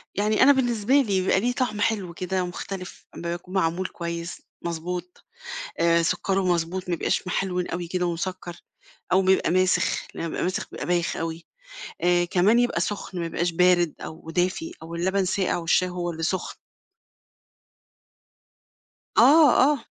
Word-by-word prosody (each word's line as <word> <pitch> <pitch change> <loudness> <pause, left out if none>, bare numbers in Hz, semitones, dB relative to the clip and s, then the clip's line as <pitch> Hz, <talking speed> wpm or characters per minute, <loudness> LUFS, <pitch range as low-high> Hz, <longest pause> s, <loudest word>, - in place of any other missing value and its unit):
يعني 210 +4 +2
أنا 285 - +8
بالنسبة 245 -3 +1
لي 285 -1 +6 0.2
بيبقى 190 +1 +2
ليه 245 +4 0
طعم 230 -5 -2
حلو 200 -6 0
كده، 185 +1 -2
ومختلف 180 +1 -7
أمّا 170 0 -4
بيكون 180 +2 -7
معمول 180 0 0
كويس 170 0 -6 0.2
مضبوط، 175 +1 -5 0.6
آآ، 170 0 +4
سكره 195 +3 0
مضبوط، 175 +1 -1
ما 175 - +1
يبقاش 175 - -1
محلوِن 180 -1 -1
أوي 175 0 -4
كده 180 0 -1
ومسكّر، 175 0 -4 0.5
أو 190 - +5
بيبقى 190 -2 +3
ماسخ، 185 +1 +1
لمّا 165 - -4
بيبقى - - -3
ماسخ 185 - -2
بيبقى - - -5
بايخ 175 -1 0
أوي، 165 0 -5 0.6
آآ، 175 0 +3
كمان 190 +7 +3
يبقى 240 -8 +1
سخن، 200 -2 -4
ما 170 - -2
يبقاش 170 +1 -1
بارد 175 -1 +3
أو 160 0 -9
دافي، 185 - -1
أو 165 +1 -8
اللبن 190 +3 0
ساقع 190 0 0
والشاي 175 +2 +2
هو 175 -1 -3
اللي 165 0 -6
سخن. 185 +2 -2 2.6
آه، 300 0 +7 0.2
آه. 280 -6 -4
180 Hz, 155 wpm, -25 LUFS, 170-195 Hz, 2.6 s, أنا